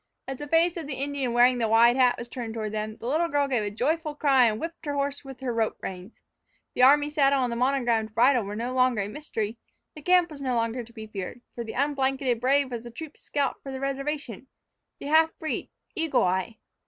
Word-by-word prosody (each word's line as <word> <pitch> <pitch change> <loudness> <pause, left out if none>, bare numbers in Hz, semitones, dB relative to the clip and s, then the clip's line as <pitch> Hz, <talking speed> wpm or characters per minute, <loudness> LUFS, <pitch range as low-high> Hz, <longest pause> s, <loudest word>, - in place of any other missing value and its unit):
As 270 -1 -5
the 295 - -6
face 330 +3 +3
of 320 -4 -5
the 280 - -4
Indian 275 -2 -2
wearing 245 +1 +4
the 230 - +1
wide 230 +2 +5
hat 250 -2 +4
was 240 - -7
turned 235 -2 -6
toward 215 -2 -3
them, 215 0 -4
the - - -10
little 315 +7 +1
girl 285 -3 +1
gave 255 -5 0
a 205 - -2
joyful 300 - -1
cry 270 -4 +4
and 215 -1 -1
whipped 330 -1 -7
her 290 - -1
horse 280 0 -2
with 270 -2 -11
her 250 -2 -2
rope 225 -1 0
reins. 185 +3 -7 0.6
The - - -1
army 290 +3 +6
saddle 280 -2 +2
and 245 - -1
the - - -2
monogrammed 235 -4 0
bridle 245 +1 +4
were 200 +1 -6
no 240 +3 -3
longer 255 -5 +2
a - - -4
mystery, 225 -4 -4 0.3
the 305 - -11
camp 360 +1 +3
was 285 -2 -9
no 255 -2 -1
longer 230 +1 -1
to 235 - -16
be 220 -2 -9
feared, 215 +2 -7
for 235 - -5
the 220 - -7
unblanketed 270 -3 0
brave 270 +1 +2
was 235 -2 -4
the 240 - -8
troop's 305 +6 -10
scout 285 -1 -2
from 270 - -7
the 265 - -5
reservation, 275 -3 -4 0.5
the - - -10
half 320 +2 +3
breed, 315 - -4 0.2
Eagle 325 -8 +1
Eye! 190 +5 -1
255 Hz, 230 wpm, -26 LUFS, 230-285 Hz, 0.6 s, army